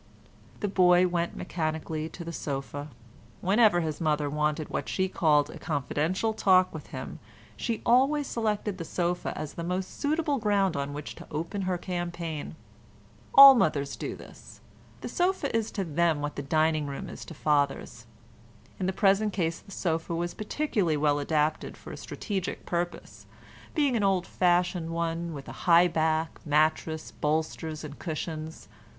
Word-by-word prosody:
The 205 - 0
boy 180 -2 +5
went 175 -1 -1
mechanically 160 -1 -3
to 170 - -8
the 170 - -5
sofa. 145 0 -4 0.5
Whenever 200 -2 +4
his 155 -1 -3
mother 150 -2 +1
wanted 150 +1 -1
what - - -3
she 190 0 0
called 150 -5 +2
a - - -10
confidential 160 - -1
talk 185 -3 +4
with 160 - -8
him - - -7 0.4
she 230 -3 -3
always 275 +4 +4
selected 210 -5 -2
the - - -3
sofa 175 +1 -2
as 155 -1 -5
the 170 - -5
most 180 +2 -3
suitable 300 -1 0
ground 200 -5 +2
on 140 0 -3
which 145 0 -6
to - - -11
open 165 +6 -3
her 180 - 0
campaign. 175 -4 -4 0.8
All 275 0 +12
mothers 150 - +1
do - - -5
this; - - -13 0.4
the - - -5
sofa 355 -8 0
is 225 -1 0
to 195 - -1
them 165 -1 +1
what 145 0 -4
the - - -3
dining 155 +1 +1
room 140 -1 -5
is - - -8
to 165 - -10
fathers. 145 -2 0 0.7
In 185 - -1
the 190 - 0
present 200 +2 +3
case 165 -3 -1
the - - -19
sofa 165 -3 -2
was 175 +1 -2
particularly 210 - -1
well 145 0 +2
adapted 150 +1 0
for - - -10
a - - -6
strategic 195 -5 -4
purpose, 175 0 -4 0.5
being 285 -5 +2
an 220 - +1
old 190 -2 +2
fashioned 175 -2 +1
one 170 0 -2
with 135 -1 -8
a - - -9
high 170 +1 +7
back, 160 -1 -1
mattress, 155 +1 +1
bolsters 155 +1 -2
and 145 -1 -8
cushions. 160 -1 -5
170 Hz, 160 wpm, -28 LUFS, 155-190 Hz, 0.8 s, All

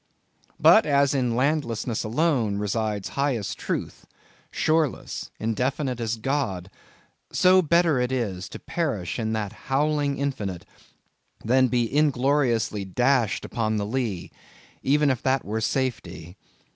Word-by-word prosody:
But 220 - +6
as 140 -1 +3
in 125 -4 0
landlessness 125 -4 0
alone 120 -4 +1
resides 105 -1 -2
highest 135 -7 -2
truth, - - -4 0.4
shoreless, 155 -3 -1
indefinite 125 +3 -1
as 115 -1 -1
God—so, 135 - -1
better 170 -3 +3
is 120 -8 -2
it - - -15
to - - -8
perish 130 - -3
in 110 -1 -1
that 110 -2 -3 0.2
howling 145 0 +1
infinite, 100 -10 -3 0.8
than 130 +3 +4
be 125 -1 +1
ingloriously 130 -7 +1
dashed 120 +3 +1
upon 110 -2 -1
the 100 - -1
lee, 110 -5 -3 0.5
even 145 +1 +3
if 130 -2 -2
that 130 0 0
were 110 +2 -2
safety! 95 -10 -3
125 Hz, 120 wpm, -25 LUFS, 110-140 Hz, 0.8 s, But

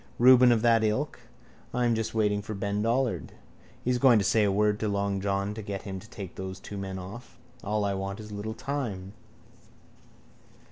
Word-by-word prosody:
Reuben 125 0 +7
of 115 -1 +2
that 115 -2 +4
ilk. 110 +8 -1 0.6
I'm 120 -1 +2
just 110 0 -2
waiting 105 -2 +2
for 110 +1 -6
Ben 100 +1 -1
Dollard. 120 +3 0 0.5
He's 125 0 +1
going 125 -3 +6
to 100 - +1
say 110 +1 +3
a 100 - +3
word 105 +1 +2
to 110 - -1
long 100 -1 -1
John 100 +1 -1
to 110 - -6
get 100 -1 -5
him 95 -2 -5
to 110 - -14
take 100 -6 -8
those 95 0 -6
two 105 - -9
men 95 -1 -4
off. 105 +6 -9 0.3
All 105 0 0
I 100 - 0
want 95 +1 -4
is 105 -1 -9
a - - -7
little 105 +2 -4
time. 110 -10 -4
105 Hz, 195 wpm, -28 LUFS, 100-115 Hz, 0.6 s, Reuben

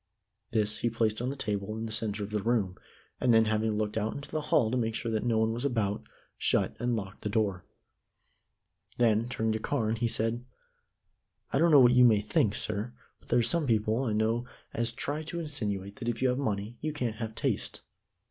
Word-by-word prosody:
This 110 -1 0
he 120 - +1
placed 110 -1 0
on 125 - -1
the 140 - -3
table 105 -4 -3
in 110 - -3
the 110 - -5
center 110 -1 +1
of 100 - -6
the 105 -1 -1
room, 105 -5 0 0.4
and 125 - +3
then, 115 -1 +6
having 110 0 +1
looked 110 +1 -1
out 110 +1 -2
into 140 - -7
the 155 - -1
hall 110 -6 +3
to - - 0
make 115 -3 0
sure 115 -1 -2
that 110 -1 0
no 120 -2 +1
one 110 0 +2
was 120 +2 -4
about, 110 -7 0 0.4
shut - - +1
and 120 0 0
locked 100 -3 -6
the 105 - -2
door. 100 -4 0 1.3
Then, 115 -1 +3
turning 110 -3 -1
to 110 - -1
Carne, 110 -2 0
he 120 +1 +1
said: 115 +2 0 1.1
"I 135 - +3
don't 170 +2 +5
know 145 -4 +8
what 120 -1 +7
you 125 0 +6
may 110 -4 +6
think, 105 0 +1
sir, 110 +4 -1 0.3
but - - -23
there 120 - +3
are 120 - +4
some 155 +5 +1
people 110 +1 +1
I 110 - 0
know 110 +3 0 0.3
as 115 0 0
try 145 +5 -3
to 165 +2 -5
insinuate 105 - -4
that 120 - -3
if 115 - -2
you 130 - +2
have 125 +2 0
money 110 -2 -3
you 155 0 -2
can't 120 -7 -2
have 110 -1 -5
taste. - - -2
115 Hz, 220 wpm, -29 LUFS, 110-120 Hz, 1.3 s, know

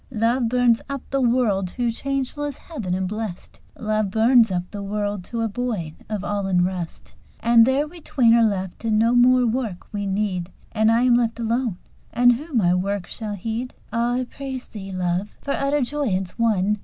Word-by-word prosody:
Love 235 0 +1
burns 245 -1 +3
up 275 -2 -4
the 275 0 +1
world 235 -6 +2
to 240 +5 -1
changeless 275 +3 -3
heaven 220 - -4
and 185 0 -1
blest, 210 -2 -6 0.2
"Love 215 -2 0
burns 225 +1 +4
up 175 -1 0
the 205 - -6
world 205 -1 -2
to 230 +5 -4
a 225 - +1
void 210 -8 -3 0.2
of 210 -3 -3
all 205 -1 -2
unrest." 180 -2 -1 0.3
And 230 0 +5
there 275 +3 +2
we 340 +2 -13
twain 240 -6 +3
are 235 - +5
left, 190 -3 -1
and 220 -2 +2
no 230 +2 +3
more 250 +1 +5
work 225 -6 -2
we 205 -1 -2
need: 190 -3 -1 0.2
"And 220 0 +3
I 230 +2 +3
am 250 -1 +5
left 235 -1 +1
alone, 230 -3 0 0.3
and 245 +1 +5
who 300 +7 -6
my 180 -6 +4
work 190 +1 -1
shall 215 -2 -5
heed?" 225 +5 -4 0.2
Ah! 235 +1 +1
I 255 +1 0
praise 265 0 -7
thee, 195 -3 -8
Love, 180 +2 -2
for 280 - -4
utter 280 +1 +1
joyance 240 -9 -1
won! 210 -3 +1
225 Hz, 190 wpm, -23 LUFS, 200-245 Hz, 0.3 s, And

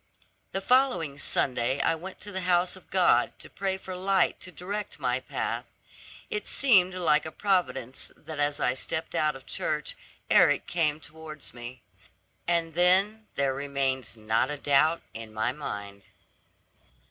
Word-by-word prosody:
The 195 - -2
following 195 - +2
Sunday 130 -1 +1
I 165 - +3
went 180 +4 -8
to 205 - -5
the 190 -1 -3
house 180 0 +2
of 185 - -15
God 185 -2 +3
to - - -10
pray 190 -1 -1
for 190 -1 -7
light 190 0 +2
to 185 - -9
direct 200 +6 -5
my - - +1
path. - - -3 0.7
It 425 -2 -3
seemed 190 -9 +4
like 155 -4 +3
a 160 - -6
providence 135 - -1
that 155 -2 -8
as 145 0 +1
I 125 - +2
stepped 160 +4 -4
out 155 -1 +1
of 135 0 -12
church 150 0 -2 0.3
Eric - - +5
came 155 -3 +1
towards 155 -1 -9
me; 120 +1 -9 0.6
and 170 -1 +1
then 195 +6 +3
there 140 -1 +1
remained 135 -4 -2
not 110 +4 +1
a 150 - -3
doubt 145 +4 +3
in 110 -1 -8
my 110 +3 0
mind. 100 -8 -6
155 Hz, 155 wpm, -28 LUFS, 135-185 Hz, 0.7 s, Eric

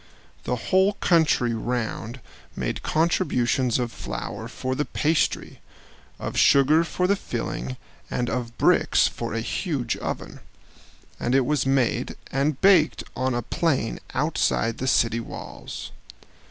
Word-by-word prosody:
The 125 - 0
whole 190 - +2
country 160 -11 +2
round 115 +1 -3 0.3
made - - -3
contributions 130 -7 +1
of 120 -2 -2
flour - - -6
for 130 0 -3
the 145 - 0
pastry, 155 +2 0 0.6
of - - -5
sugar 145 +4 +5
for 180 +2 -1
the 200 +2 +3
filling, 65 - -4 0.3
and 125 - -1
of 120 0 -3
bricks - - +4
for - - -4
a 115 - -1
huge 130 - -2
oven; - - -5 0.8
and 120 +2 0
it 135 -2 +4
was 145 -2 +1
made 135 -3 +1 0.2
and 140 +1 0
baked 185 -5 +5
on 130 -1 0
a 120 - -1
plain 130 -3 0 0.2
outside 65 - +1
the 130 - -2
city 115 -3 +3
walls. 115 - -8
130 Hz, 130 wpm, -25 LUFS, 120-155 Hz, 0.8 s, sugar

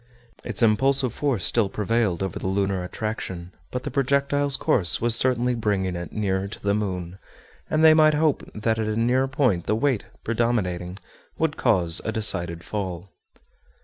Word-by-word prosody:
Its 115 -1 -3
impulsive 130 +3 +2
force 135 -9 -1
still 110 -4 +1
prevailed 105 -3 -1
over 95 -3 -4
the - - -4
lunar 95 -1 -1
attraction, 90 -3 -5 0.2
but 125 - -5
the 145 - -5
projectile's 140 +1 +1
course 90 -6 +2
was 120 0 +4
certainly 125 0 +1
bringing 100 -5 -1
it 85 0 -6
nearer 95 -2 -1
to 100 - -8
the 100 0 0
moon, 95 -3 -3 0.5
and 155 +1 +1
they 160 -1 +8
might 155 -1 +5
hope 155 -1 +1
that 110 +1 -1
at 110 - -1
a 110 - -1
nearer 125 +3 +2
point 125 - 0
the 105 - +2
weight, 130 -1 0 0.2
predominating, 100 -6 -1 0.4
would 160 -1 0
cause 85 -5 +3
a 110 - -2
decided 85 -6 0
fall. 95 -3 -5
110 Hz, 165 wpm, -24 LUFS, 95-130 Hz, 0.5 s, they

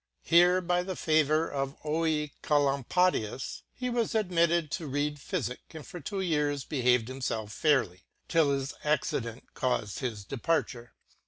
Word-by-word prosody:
Here 175 +2 +5
by 180 0 +1
the 185 +1 -4
favour 155 0 +2
of 135 0 -3
Oecolampadius 150 - 0
he 250 - -4
was 235 -2 0
admit 175 -6 +3
ted 170 -3 0
to 165 -4 -3
reade 145 +2 -1
Phyfick, 140 -2 -4
and 155 - -8
for 175 - -8
two 195 +6 -4
years 150 -5 0
behaved 125 -5 +2
himfelf 125 -5 -3
fair 145 +1 +3
ly 90 +1 -18 0.3
,till 165 -4 +3
this 135 +1 -4
accident 130 -6 -1
caufed 125 -5 -1
his 110 -7 -4
departure. 125 -2 -2
150 Hz, 145 wpm, -29 LUFS, 130-170 Hz, 0.3 s, Here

